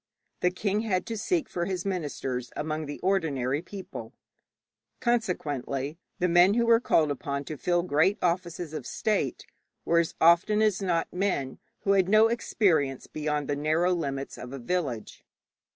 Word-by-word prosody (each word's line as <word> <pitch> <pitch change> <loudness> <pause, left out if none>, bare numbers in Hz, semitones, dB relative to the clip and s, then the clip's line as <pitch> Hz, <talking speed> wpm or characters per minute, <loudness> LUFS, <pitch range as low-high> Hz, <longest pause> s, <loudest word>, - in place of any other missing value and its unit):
The 180 - +3
king 200 +3 -1
had 205 -5 0
to 230 -1 -4
seek 290 - 0
for 175 -1 -2
his 185 0 -3
ministers 140 -9 -3
among 155 0 -3
the 145 - -6
ordinary 150 -8 0
people, 190 +2 -8 0.9
consequently 155 - -1 0.2
the 180 - +1
men 175 +4 +5
who 235 0 +3
were 230 -1 +6
called 155 -10 +2
upon 140 0 -3
to 155 - -6
fill 175 +4 +1
great 180 +4 +2
offices 175 -2 -1
of 155 - -5
state 215 -2 -1 0.4
were 170 - +4
as 170 - -1
often 170 +6 +5
as 215 -3 +2
not 175 -4 0
men 180 -9 -1 0.2
who 200 - +1
had 190 -2 +3
no 215 +2 +6
experience 165 - +1
beyond 150 -1 -2
the 145 - 0
narrow 155 +5 +2
limits 140 -5 -3
of 125 - -8
a - - -4
village. 135 -4 -3
175 Hz, 160 wpm, -28 LUFS, 145-195 Hz, 0.9 s, were